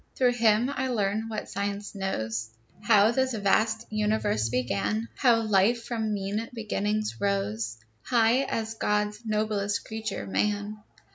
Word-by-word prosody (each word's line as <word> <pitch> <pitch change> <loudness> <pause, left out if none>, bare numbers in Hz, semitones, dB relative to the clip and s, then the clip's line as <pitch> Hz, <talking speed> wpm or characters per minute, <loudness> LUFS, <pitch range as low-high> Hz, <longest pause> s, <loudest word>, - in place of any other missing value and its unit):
Through 250 -2 +3
him 230 +1 +3
I 260 +1 -1
learn 215 -2 -1
what 215 -1 -4
Science 200 +1 -4
knows, 115 - -3 0.3
How 210 0 +5
this 260 0 0
vast 220 +2 +1
universe 210 - +1
began; 110 -3 -1
How 235 - +4
life, 215 +3 +3
from 225 -3 -2
mean 205 +3 -2
beginnings, 215 - -1
rose 105 +3 -1 0.2
High 235 - +3
as 225 -3 -2
God's 210 0 -1
noblest 210 -1 0
creature, 220 0 -4
man. 205 +1 -1
210 Hz, 130 wpm, -27 LUFS, 195-225 Hz, 0.3 s, How